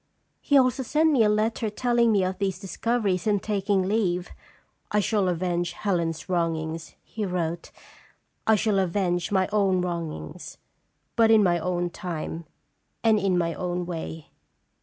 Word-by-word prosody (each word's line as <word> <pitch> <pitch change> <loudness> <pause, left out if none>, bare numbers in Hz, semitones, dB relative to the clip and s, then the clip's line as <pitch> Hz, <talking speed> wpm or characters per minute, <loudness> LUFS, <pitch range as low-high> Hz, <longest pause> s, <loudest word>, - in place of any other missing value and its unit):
" - - -47
He 285 - +3
also 255 0 +3
sent 310 +5 +2
me 270 -6 +3
a 210 - +4
letter 215 +1 0
telling 235 +1 +2
me 200 -3 +3
of 185 +1 -2
these 195 -3 -1
discoveries 200 0 -1
and 205 -1 +3
taking 200 -1 0
leave. 185 -3 0 0.3
' - - -43
1 210 -1 +2
shall 200 -4 +1
avenge 175 0 -1
Helen's 170 -4 -2
wrongs,' 165 -2 -2
he 220 - -5
wrote, 175 -3 -2 0.4
' - - -40
I 220 - +6
shall 210 -1 +1
avenge 175 0 0
my 190 -2 +2
own 195 -3 +2
wrongs, 170 -1 -5 0.6
but 230 -1 +4
in 220 -2 +6
my 175 -2 +2
own 175 0 -1
time 170 -2 -5 0.6
and 220 -2 +4
in 195 -3 +1
my 170 -1 0
own 180 0 -3
way. 165 -2 -6
185 Hz, 160 wpm, -26 LUFS, 175-215 Hz, 0.6 s, I